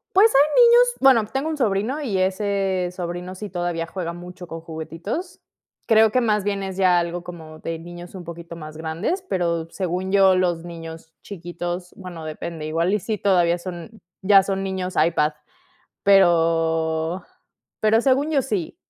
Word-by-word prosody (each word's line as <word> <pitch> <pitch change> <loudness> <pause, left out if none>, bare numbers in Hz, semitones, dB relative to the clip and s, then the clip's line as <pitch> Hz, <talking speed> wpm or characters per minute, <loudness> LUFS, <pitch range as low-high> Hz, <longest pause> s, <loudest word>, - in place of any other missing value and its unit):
Pues, 415 +4 +7
hay 300 - +5
niños 480 +1 +6
bueno, 260 -5 +5
tengo 270 +3 -1
un 315 - -2
sobrino 230 +4 0
y 225 -10 -1
ese 190 -1 0
sobrino 180 0 -5
sí 200 +2 -7
todavía 175 -2 -2
juega 170 -2 -4
mucho 180 +1 -10
con 165 -1 -7
juguetitos. 165 - -6 0.5
Creo 220 -1 +5
que 255 - +3
más 210 -4 +1
bien 200 -1 -2
es 190 -1 -5
ya 185 -2 +4
algo 170 0 -3
como 160 -3 -10
de 165 0 -5
niños 175 +1 -10
un 185 -3 -9
poquito 170 0 -9
más 155 -1 -9
grandes, 165 - -2
pero 170 -2 -1
según 185 0 -3
yo, 195 -1 +5
los 175 -2 0
niños 165 -1 -9
chiquitos 175 -1 -6
bueno 175 -4 -9
depende, 155 0 -6
igual, 165 +4 0
y 210 - +2
sí, 215 +3 -3
todavía 175 -4 +3
son, 185 +4 -9 0.2
ya 195 0 +6
son 195 0 -2
niños 190 -1 -3
iPad. 155 -1 +2 0.7
Pero 165 -2 +2 0.6
pero 215 +1 +4
según 275 +4 +2
yo, 290 -3 +3
sí. 210 -11 -3
180 Hz, 165 wpm, -22 LUFS, 170-205 Hz, 0.7 s, Pues